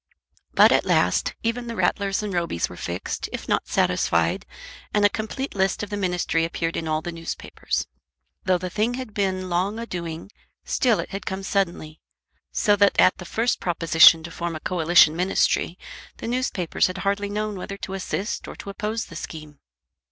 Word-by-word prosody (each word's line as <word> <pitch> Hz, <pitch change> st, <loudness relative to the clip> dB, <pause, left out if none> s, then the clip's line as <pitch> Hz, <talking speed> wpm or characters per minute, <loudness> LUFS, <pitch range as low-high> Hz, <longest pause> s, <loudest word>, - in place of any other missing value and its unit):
But -, -, +7 dB
at -, -, +4 dB
last -, -, +2 dB
even 235 Hz, +1 st, -1 dB
the 230 Hz, -, -4 dB
Rattlers 195 Hz, +2 st, 0 dB
and 205 Hz, -2 st, -3 dB
Robys 170 Hz, -, -1 dB
were -, -, -9 dB
fixed, -, -, -4 dB
if -, -, -6 dB
not -, -, 0 dB
satisfied, 85 Hz, 0 st, +1 dB, 0.5 s
and 205 Hz, -1 st, +4 dB
a -, -, +6 dB
complete 225 Hz, +6 st, -4 dB
list 190 Hz, +1 st, 0 dB
of 210 Hz, -, -6 dB
the -, -, -1 dB
ministry 180 Hz, -4 st, 0 dB
appeared 165 Hz, 0 st, -2 dB
in 160 Hz, -, -3 dB
all 155 Hz, 0 st, -1 dB
the 175 Hz, -, -4 dB
newspapers. 165 Hz, -1 st, -4 dB, 0.6 s
Though 185 Hz, -1 st, +3 dB
the 180 Hz, 0 st, -5 dB
thing 220 Hz, +5 st, 0 dB
had 255 Hz, -4 st, -6 dB
been 190 Hz, -2 st, -1 dB
long 185 Hz, +4 st, 0 dB
a 230 Hz, -, -4 dB
doing, 170 Hz, -1 st, -6 dB, 0.3 s
still 240 Hz, -6 st, +2 dB
it -, -, -5 dB
had 195 Hz, 0 st, -6 dB
come 190 Hz, +1 st, -3 dB
suddenly, 170 Hz, -6 st, -2 dB, 0.5 s
so 205 Hz, -2 st, +3 dB
that 200 Hz, 0 st, +4 dB
at 185 Hz, -, +5 dB
the 180 Hz, -, -8 dB
first 230 Hz, +6 st, 0 dB
proposition 165 Hz, -1 st, +6 dB
to 170 Hz, -, -8 dB
form 170 Hz, 0 st, -4 dB
a -, -, -5 dB
coalition 165 Hz, -2 st, +4 dB
ministry, 180 Hz, +3 st, +1 dB, 0.4 s
the -, -, -6 dB
newspapers 235 Hz, -8 st, 0 dB
had 185 Hz, +1 st, -5 dB
hardly 200 Hz, +1 st, 0 dB
known 210 Hz, 0 st, -2 dB
whether 195 Hz, +1 st, -6 dB
to 195 Hz, -, -6 dB
assist 195 Hz, +2 st, -3 dB
or -, -, -8 dB
to 200 Hz, -, -7 dB
oppose 220 Hz, +2 st, -3 dB
the 165 Hz, -, -12 dB
scheme. 155 Hz, -2 st, -8 dB
190 Hz, 185 wpm, -24 LUFS, 170-210 Hz, 0.6 s, But